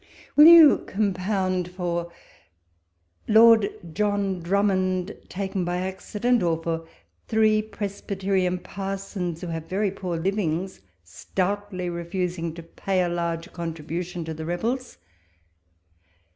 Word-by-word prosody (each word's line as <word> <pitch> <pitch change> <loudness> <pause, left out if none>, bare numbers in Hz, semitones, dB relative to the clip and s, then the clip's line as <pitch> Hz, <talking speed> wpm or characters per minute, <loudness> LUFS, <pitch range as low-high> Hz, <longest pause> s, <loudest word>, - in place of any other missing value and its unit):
will 300 +2 +9
you 330 -3 +9
compound 185 -2 -1
for 175 -1 -3 1.2
Lord 220 -1 +6 0.2
John 205 -2 0
1 170 0 -10
)rummond, 185 -1 +1
taken 190 -1 -3
by 175 0 -1
accident 210 +6 -1
'I - - +1
or 165 0 -1
for 165 0 -3 0.4
three 215 -1 +3
Presbyterian 195 -3 -2
parsons, 195 -2 -5
who 180 - -5
have 165 -1 -5
very 200 +1 0
poor 180 -3 -4
livings, 185 - -2 0.2
stoutly 185 - -3
refusing 170 0 -3
to 170 - -9
pay 185 +3 -1
a 175 - -1
large 170 -1 -3
con 170 -2 -4
tribution 170 +2 -5
to 160 - -4
the 160 0 -7
rebels'? 235 +10 -3
185 Hz, 120 wpm, -25 LUFS, 170-200 Hz, 1.2 s, will